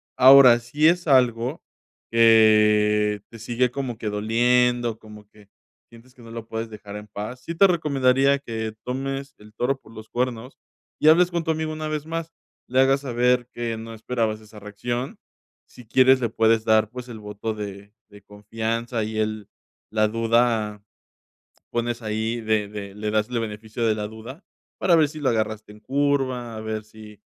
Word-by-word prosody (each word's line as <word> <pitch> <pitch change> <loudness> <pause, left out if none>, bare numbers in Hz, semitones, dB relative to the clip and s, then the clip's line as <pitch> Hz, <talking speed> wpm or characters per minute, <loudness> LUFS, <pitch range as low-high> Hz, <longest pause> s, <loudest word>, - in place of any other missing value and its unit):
Ahora, 130 -2 +8
si 145 +7 +1
es 175 0 +2
algo 125 +1 +2 0.5
que 105 -2 +4
te 115 - -12
sigue 120 +2 0
como 125 -4 -4
que 110 -2 -4
doliendo, 120 +2 +1
como 105 -1 -14
que 105 -1 -21 0.4
sientes 120 +2 -18
que 125 - -18
no 115 - -13
lo 115 -1 -7
puedes 115 0 -5
dejar 105 -1 -10
en 105 0 -10
paz. 105 +5 -7
Sí, 170 - -6
te 195 - +6
recomendaría 140 -5 +2
que 110 -4 -5
tomes 135 +2 -4
el 105 0 -16
toro 135 +3 -1
por - - -18
los 110 0 -11
cuernos 125 +1 -3 0.4
y 155 - +3
hables 175 +3 +6
con 170 -1 -1
tu 160 - -5
amigo 155 0 -3
una 155 0 -5
vez 155 0 -3
más, 165 0 -5 0.4
le 130 +1 +1
hagas 135 +1 +3
saber 125 -1 +1
que 120 -1 -4
no 115 +1 -8
esperabas 110 -1 -2
esa 105 0 -14
reacción. 120 +5 -5 0.5
Si 125 - -15
quieres, 130 +2 +4
le 115 - 0
puedes 110 0 +2
dar, 110 -1 +3
pues, 125 0 -8
el 115 - -8
voto 105 +1 -5
de 100 -1 -8 0.2
de 105 0 -15
confianza 115 +3 -4
y 110 0 -5
el 110 -1 -3 0.4
la 110 -1 +2
duda, 115 -2 0 0.9
pones 120 0 -2
ahí 110 +2 -2
de 110 -2 0
de 100 -1 -8
le 105 0 -3
das 110 +1 0
el 120 - -1
beneficio 110 +1 -4
de 110 - +2
la 105 -1 -4
duda 120 - -11 0.3
para 175 -3 +3
ver 155 -2 +4
si 155 0 -9
lo 135 - +2
agarraste 110 -2 -2
en 105 - -16
curva. 130 -2 -1
A - - -6
ver 110 -1 -4
si 110 -1 -14
115 Hz, 180 wpm, -23 LUFS, 110-130 Hz, 0.9 s, Ahora